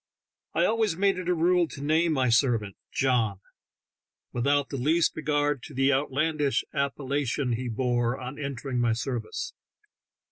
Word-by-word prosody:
I - - +3
always 220 -6 +1
made 195 -1 +2
it 180 -1 -4
a 180 - +3
rule 175 +1 +3
to 145 - -10
name 160 +2 +2
my 130 -3 +2
servant 115 -5 +2 0.2
"John," 120 -7 +1 0.9
without 140 +3 +1
the 140 - -4
least 155 +6 +2
regard 145 -2 0
to - - -11
the 135 +1 +3
outlandish 145 +1 +1
appellation 140 -1 -1
he 125 +2 -3
bore 120 +1 0
on 130 +3 -7
entering 135 -2 -3
my 120 -2 +2
service. 115 -1 -4
140 Hz, 145 wpm, -27 LUFS, 125-155 Hz, 0.9 s, I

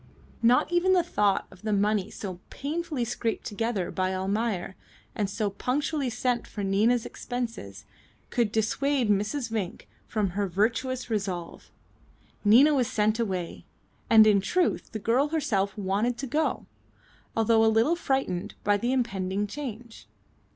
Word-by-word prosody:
Not 245 +7 +4
even 350 +2 +3
the 360 -2 +4
thought 205 - +1
of 185 - -16
the 215 0 -2
money 205 -1 +1
so 185 -4 -7
painfully 300 -3 -3
scraped 230 0 -2
together 210 -3 -2
by 185 0 -1
Almayer, 195 0 -2 0.4
and 205 -2 -1
so 205 0 -1
punctually 275 +5 -1
sent 245 0 -1
for 205 - -5
Nina's 215 +5 +2
expenses, 230 - -5 0.5
could 235 -4 +1
dissuade 235 +2 +1
Mrs. 220 +5 -1
Vinck 205 -5 -4 0.2
from 210 -4 -1
her 200 +2 -1
virtuous 235 +7 -1
resolve. 190 -5 -3 0.7
Nina 250 +9 +6
was 255 -4 +2
sent 215 -2 +1
away, 185 -6 -3 0.5
and 220 -1 +8
in 205 -2 +5
truth 350 - 0
the 220 - -4
girl 235 +7 +2
herself 225 -12 -1
wanted 205 +5 0
to 275 - -4
go, 300 +5 -1 0.7
although 225 0 +4
a - - +5
little 225 +9 +3
frightened 265 - -2
by 205 0 +3
the 240 +4 -1
impending 200 -6 -1
change. 235 -1 -8
220 Hz, 145 wpm, -27 LUFS, 200-250 Hz, 0.7 s, and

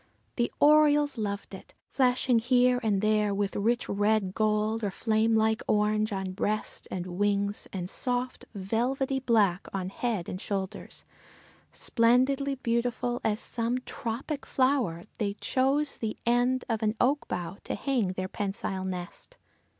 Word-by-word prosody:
The 240 -1 0
orioles 295 -1 +5
loved 200 -1 -4
it, 190 - -11
flashing 250 -2 +2
here 250 +1 +3
and 210 -4 +1
there 215 -1 +2
with 200 -1 -1
rich 235 +4 +1
red 205 -1 +1
gold 215 +1 0
or 205 - +1
flame 220 +2 +1
like 220 0 +2
orange 215 +1 +2
on 190 -1 -3
breast 210 +3 -2
and 180 -1 -4
wings 200 +2 -1
and 180 -2 -4
soft, 250 +5 -1
velvety 250 +7 -1
black 210 -8 +2
on 190 -1 -3
head 210 -4 -2
and 185 - -5
shoulders, 195 0 -4 0.7
splendidly 260 +4 +2
beautiful 240 0 -1
as 215 -1 0
some 235 +1 -1
tropic 260 +6 -4
flower, 255 -11 +1 0.2
they 200 -2 -1
chose 275 +5 0
the 220 -2 -3
end 245 +2 +2
of 225 -2 -1
an 215 0 +1
oak 280 +4 +2
bough 180 +1 -4
to - - -2
hang 240 -9 0
their 185 0 -3
pensile 195 -1 -3
nest. 185 - -7
220 Hz, 140 wpm, -28 LUFS, 200-250 Hz, 0.7 s, orioles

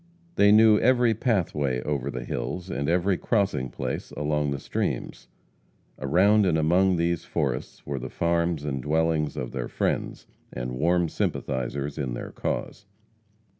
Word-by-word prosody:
They 100 -9 +5
knew 110 0 +7
every 125 -2 +4
pathway 85 - 0
over 70 -2 -2
the 65 -1 -5
hills, 90 +1 -4
and 70 +2 -2
every 90 +2 +2
crossing 100 - 0
place - - -4
along 75 0 0
the 70 - -2
streams. - - -3 0.7
Around 95 +9 +4
and 80 -3 +2
among 90 +4 +3
these 85 0 0
forests - - -3
were 70 -2 -3
the - - -6
farms 85 -2 0
and 70 -3 -2
dwellings 80 +1 0
of 60 - -4
their - - -4
friends, - - -2 0.3
and 60 0 -4
warm 85 +2 +2
sympathizers 70 0 -3
in 65 -4 -2
their - - -6
cause. - - -4
80 Hz, 145 wpm, -26 LUFS, 70-95 Hz, 0.7 s, knew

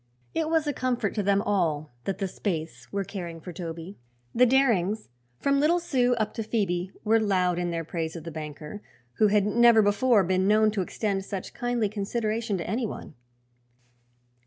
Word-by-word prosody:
It 320 -1 0
was 320 -1 +2
a 290 - 0
comfort 245 -5 -1
to 210 - 0
them 200 +1 +2
all 160 -8 0
that 195 - -2
the 195 - -1
Spaythes 160 - -4
were 200 0 -1
caring 175 -4 -6
for 180 +2 -9
Toby. 170 +2 -7 0.3
The 250 +1 +5
Darings, 225 -6 +2 0.3
from 280 - +2
little 325 +5 +3
Sue 250 -7 +1
up 215 -2 -1
to - - -3
Phoebe, 195 -5 -1
were 225 +1 +4
loud 185 -4 +1
in 175 0 -1
their 165 -1 -2
praise 160 0 -4
of 165 - -7
the 165 - -6
banker, 150 +4 -7 0.4
who 215 - +5
had 205 -1 +3
never 230 +1 +5
before 205 +1 +4
been 185 +1 +1
known 215 +1 +4
to 210 -2 -1
extend 195 +1 -2
such 195 -1 -6
kindly 245 -3 0
consideration 215 +1 -2
to 170 - -5
anyone. 220 -4 -3
205 Hz, 180 wpm, -27 LUFS, 175-230 Hz, 0.4 s, The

